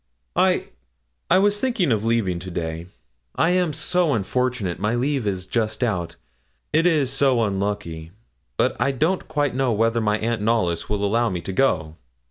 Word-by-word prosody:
'I - - +2 0.6
I 185 - +5
was 205 +2 +2
thinking 235 - +1
of 110 -2 +1
leaving 110 -6 0
today; 85 -2 -5 0.5
I 165 - +2
am 180 -3 +2
so 170 0 +1
unfortunate 115 -2 -1
my 105 +3 0
leave 130 -2 0
is 95 -2 -2
just 110 +4 -1
out 90 -8 -1 0.6
it 165 +3 +4
is 145 -6 +2
so 135 -4 +3
unlucky; 100 -5 -3 0.5
but - - +2
I 140 - +1
don't 165 +8 0
quite 145 -3 0
know 130 -1 +1
whether 115 +2 +1
my 105 -1 +1
aunt 115 0 -2
Knollys 105 -7 0
will 105 -1 0
allow 115 +3 +2
me 90 - -3
to 95 - -5
go.' 85 -9 +1
115 Hz, 165 wpm, -23 LUFS, 95-135 Hz, 0.6 s, I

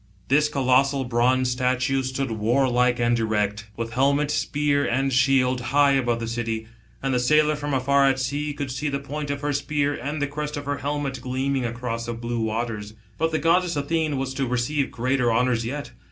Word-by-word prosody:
This 150 +3 +4
colossal 135 0 +2
bronze 125 +1 +2
statue 130 +2 +1
stood 130 0 -3
warlike 125 +2 +2
and 120 0 +2
erect, 105 -1 -1
with 115 0 -4
helmet, 140 +3 +2
spear, 145 -1 +1
and 135 +2 0
shield, 130 -1 +3
high 140 +3 +3
above 120 -4 +1
the 115 - -4
city. 115 -1 -3 0.4
And 135 -1 0
the 125 - +2
sailor 150 +4 +3
from 145 0 -4
afar 140 +1 +3
at 135 - +1
sea, 145 +3 -2
could 140 -2 -4
see 145 +4 -2
the 140 - -1
point 145 +1 -5
of 140 0 -3
her 145 0 -1
spear 145 0 0
and 145 +2 -4
the 145 - +1
crest 150 +1 -4
of 145 - -6
her 145 0 -2
helmet 140 -2 -3
gleaming 130 +1 -1
across 115 -1 -4
the 120 - -2
blue 120 0 -3
waters. 110 -1 -3 0.2
But 160 +1 +2
the 160 - 0
goddess 170 +3 +2
Athene 150 0 0
was 130 0 -3
to 135 0 -1
receive 125 +4 0
greater 125 0 0
honours 120 0 +1
yet. 145 +3 -5
135 Hz, 195 wpm, -24 LUFS, 120-145 Hz, 0.4 s, This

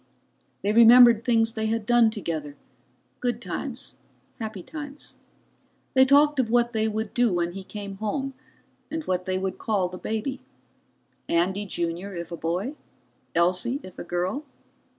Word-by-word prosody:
They 205 +1 +1
remembered 235 0 +8
things 225 -2 +2
they 220 -1 -1
had 225 -1 -1
done 240 -1 +5
together, 160 -9 -4 0.6
good 245 -2 -1
times, - - -5 0.4
happy 215 -5 -5
times. 290 - -8 0.8
They 260 0 +6
talked 290 +1 +5
of 240 -4 +1
what 240 +1 +2
they 220 0 +1
would 220 0 -3
do 240 -3 +3
when 175 0 0
he 195 +2 -7
came 200 0 -7
home, 265 +6 -2 0.6
and 320 0 -3
what 185 -6 -2
would 185 0 -1
they 190 - 0
call 195 -4 -1
the 180 0 -9
baby? 225 +5 -3 0.9
Andy 190 +4 +1
Junior 175 +2 -3
if 170 0 -6
a - - -3
boy? 180 - -2 0.6
Elsie 180 +10 +2
if 185 -1 -11
a - - -4
girl? 180 - -2
215 Hz, 150 wpm, -25 LUFS, 185-240 Hz, 0.9 s, remembered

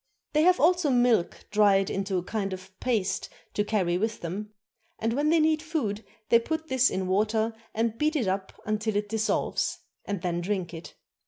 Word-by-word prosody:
They 305 - +4
have 365 +3 +5
also 350 -1 +4
milk 245 -7 +2
dried 200 -2 +4
into 195 -1 -1
a 175 - -1
kind 195 0 -2
of 185 0 -9
paste 225 -7 -1 0.2
to 205 - +1
carry 185 -5 0
with 220 +2 -2
them; 195 +5 -4 0.5
and 225 +1 -1
when 290 +4 +1
they 330 +1 +4
need 310 0 +3
food 275 -11 -2 0.3
they 235 - +7
put 320 +6 -4
this 260 0 +4
in 190 0 -2
water 215 +4 +1 0.2
and 225 0 0
beat 305 +1 +1
it 245 -9 +1
up 190 0 -1 0.3
till 220 -1 -2
it 205 0 -1
dissolves, 220 0 0 0.3
and 200 -4 -4
then 175 -1 -1
drink 185 -2 -2
it. 165 +1 -9
215 Hz, 185 wpm, -27 LUFS, 190-255 Hz, 0.5 s, they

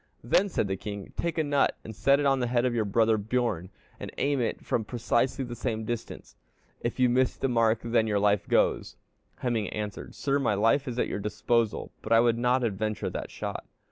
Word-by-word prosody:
Then 185 - +3
said 110 - 0
the 95 0 -2
king, 100 0 -7
'Take 170 -1 -2
a 160 - +2
nut 145 -1 +1
and 110 - -8
set 140 +6 +3
it 145 - 0
on 135 -1 +3
the 125 - 0
head 120 0 +1
of 125 - +1
your 115 -2 0
brother 110 +2 +2
Bjorn, 105 -5 -1 0.3
and - - -6
aim 140 -1 +1
at 115 - +2
it - - -22
from 115 - 0
precisely 120 +3 0
the 120 - -6
same 110 -1 -3
distance. 120 0 -6 0.4
If 120 +2 -3
you 125 - +5
miss 125 +1 +2
the - - 0
mark, 115 -2 +2
then 115 -1 +2
your 105 -1 +1
life 100 0 +2
goes.' - - +1 0.5
"Hemingr 115 -5 0
answered, 105 -1 -5
'Sire, 140 0 0
my 120 -6 +1
life 115 +7 +2
is 125 -1 -4
at - - +1
your - - -3
disposal, 110 +2 0
but 110 - -7
I 115 - +7
will 120 0 +4
not 125 +2 +1
adventure 110 -1 -2
that - - -5
shot.' - - -6
115 Hz, 220 wpm, -28 LUFS, 110-125 Hz, 0.5 s, I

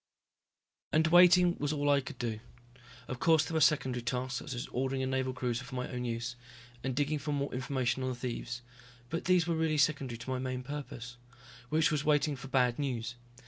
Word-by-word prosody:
And 160 +1 +4
waiting 175 +1 +6
was 145 0 0
all 145 -1 -1
I 140 -1 +4
could 130 - -9
do. 115 -3 -3 0.7
Of 125 - -5
course 160 -2 +4
there 165 - -6
were 160 - +2
secondary 135 -5 +3
tasks, 125 +1 -2
such 140 - -6
as 120 - -3
ordering 130 +1 -1
a - - +1
Naval 130 0 0
cruiser 125 -1 -2
for 130 0 -8
my 125 0 -2
own 125 -1 -4
use, 120 +1 -3 0.5
and 130 -2 -2
digging 145 +2 0
for 145 +2 -3
more 140 -1 -1
information 130 -1 -1
on 130 - -1
the 130 - -3
thieves, 120 -1 -5 0.5
but 165 - -2
these 180 -2 +4
really 160 -2 +1
were - - +1
secondary 140 -5 +1
to 115 +3 -8
my 130 - -1
main 130 0 -3
purpose. 125 -3 -7 0.5
Which 155 +1 +3
was 150 -2 0
waiting 150 -1 +2
for 135 +1 -9
bad 125 -2 +2
news. 120 -4 -2
130 Hz, 205 wpm, -32 LUFS, 125-150 Hz, 0.7 s, waiting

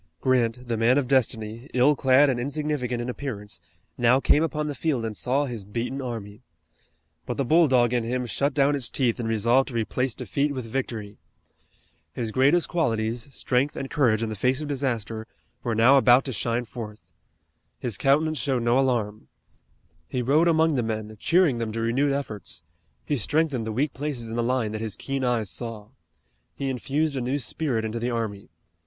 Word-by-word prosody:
Grant, 125 0 +1
the 115 -1 -1
man 120 +4 +4
of 140 -3 +1
destiny, 115 -1 0
ill 130 +4 +5
clad 135 +2 +5
and 130 -3 0
insignificant 135 -3 -2
in - - -5
appearance, 110 -8 -5 0.4
now 120 +2 +5
came 145 - +3
upon 150 -2 -1
the 150 - -3
field 140 -6 -1
and 110 -1 -4
saw 135 +7 0
his 120 -6 -6
beaten 115 +7 -4
army. 115 -4 -6 0.9
But - - -3
the 140 - 0
bulldog 130 -6 +4
in 120 -2 +1
him 125 +2 -2
shut 140 +4 -1
down 140 0 +3
its 135 -4 0
teeth 125 -3 0
and 115 -2 -2
resolved 115 +4 +3
to 125 - -7
replace 120 +2 -1
defeat 140 0 -1
with 130 -3 -4
victory. 110 -4 -4 0.9
His 115 +2 -3
greatest 140 +8 +3
qualities, 115 -5 -1
strength 130 +3 +1
and 135 - -5
courage 115 -6 +2
in 115 - -2
the 110 - -4
face 130 +6 +1
of 150 - -4
disaster, 115 -6 -2 0.3
were 120 -2 -1
now 125 +5 +6
about 130 0 +5
to 130 - -3
shine 115 +3 -1
forth. 110 -2 -9 0.7
His 120 -5 -3
countenance 150 +4 +2
showed 125 -1 0
no 120 +2 +3
alarm. 115 -6 -1 0.8
He 125 -1 -2
rode 150 +7 +3
among 160 -1 +3
the 130 - +1
men 110 -1 -4
cheering 165 -7 +3
them 115 -2 -2
to 115 - -3
renewed 125 +5 +1
efforts. 105 -11 -4 0.4
He 145 - 0
strengthened 140 -2 0
the - - -2
weak 135 +6 0
places 135 -6 -4
in - - -4
the 120 - +1
line 120 -2 0
that 110 0 -4
his 110 -3 -4
keen 135 -1 -3
eyes 115 -5 0
saw. 115 -3 -6 0.7
He 135 -1 -2
infused 140 +4 -1
a 130 - -1
new 130 +4 -1
spirit 125 -2 -2
into 110 +1 -3
the 120 +2 -1
army. 110 -6 -3
125 Hz, 185 wpm, -25 LUFS, 115-140 Hz, 0.9 s, now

